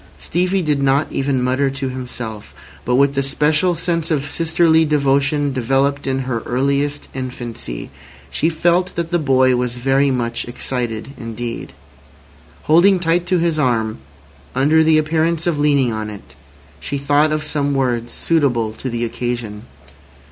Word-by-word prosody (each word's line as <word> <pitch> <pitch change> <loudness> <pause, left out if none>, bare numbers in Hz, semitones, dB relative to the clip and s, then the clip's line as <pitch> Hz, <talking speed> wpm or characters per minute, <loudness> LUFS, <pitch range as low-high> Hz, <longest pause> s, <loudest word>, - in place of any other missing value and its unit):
Stevie 180 +2 0
did 150 -3 0
not 140 +2 +2
even 135 -2 0
mutter 130 +2 +1
to 135 0 -3
himself, 125 -4 -7 0.3
but 125 - +1
with 140 +1 +3
the 135 - +1
special 150 +5 +2
sense 165 -1 0
of 145 -3 0
sisterly 160 +1 +3
devotion 145 -1 +1
developed 135 +3 0
in 135 0 0
her 125 -3 -2
earliest 140 +4 -1
infancy, 120 - -6 0.4
she 160 - +1
felt 175 +3 +1
that 170 0 -3
the 175 - +2
boy 130 -3 +3
was 125 -1 -2
very 135 +3 +2
much 120 -3 -1
excited 120 -1 -3
indeed. 115 0 -6 0.9
Holding 180 +5 +5
tight 175 +1 +1
to 185 0 +2
his 165 -2 0
arm, 115 - 0 0.6
under 150 +5 +4
the 160 0 +4
appearance 160 +1 +1
of 170 -4 0
leaning 140 -5 +2
on 110 -1 -4
it, 70 -11 -11 0.4
she 140 - -3
thought 145 +2 +2
of 155 0 -1
some 145 -2 -1
words 120 -3 -1
suitable 125 -9 +1
to 130 - -5
the 120 0 -2
occasion. 120 -2 -4
140 Hz, 150 wpm, -19 LUFS, 125-155 Hz, 0.9 s, Holding